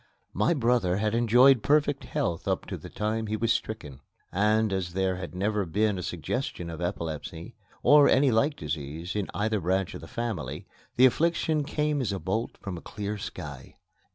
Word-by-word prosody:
My 105 - +2
brother 115 - +2
had 105 +1 0
enjoyed 120 +2 +5
perfect 145 0 +2
health 105 - -2
up - - 0
to - - -5
the - - -10
time 110 +1 -2
he 110 +1 -1
was 115 +1 +2
stricken; 75 -11 -5 0.3
and, 105 +2 +2
as 90 -2 -2
there 95 -1 0
had 90 -1 -7
never 105 +2 0
been 100 +3 0
a - - -3
suggestion 90 - -3
of 80 +1 -7
epilepsy, 85 -2 -4 0.3
or 145 -1 +7
any 135 0 +4
like 130 +7 +2
disease, 80 +3 -5
in 105 -2 -2
either 110 0 0
branch 95 +1 0
of - - -7
the - - -10
family, 105 - -4 0.3
the 130 - +7
affliction 155 +2 +2
came 150 0 0
as 120 - -1
a 100 - -2
bolt 110 +5 -2
from 95 -4 -6
a - - -16
clear 105 0 -5
sky. - - -8
105 Hz, 180 wpm, -27 LUFS, 90-120 Hz, 0.3 s, or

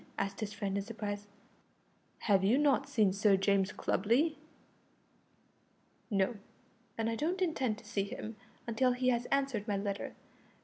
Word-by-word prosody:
asked 195 0 -2
his 215 -2 -3
friend 200 -2 -2
in - - -3
surprise, 205 -2 -5 0.9
"have 195 -3 +3
you 215 +7 +4
not 280 -1 +3
seen 215 -9 +3
Sir 200 0 +4
James 195 0 +2
Clubley?" 255 - +1 1.7
"No, 200 +2 +1 0.6
and 225 0 0
I 230 - 0
don't 335 +9 -1
intend 265 - 0
to 225 - -15
see 205 -2 -1
him 215 +2 -6 0.3
until 245 +2 +2
he 255 +1 +1
has 240 -1 +1
answered 270 -6 0
my 205 -2 0
letter. 200 0 -3
215 Hz, 145 wpm, -33 LUFS, 200-255 Hz, 1.7 s, you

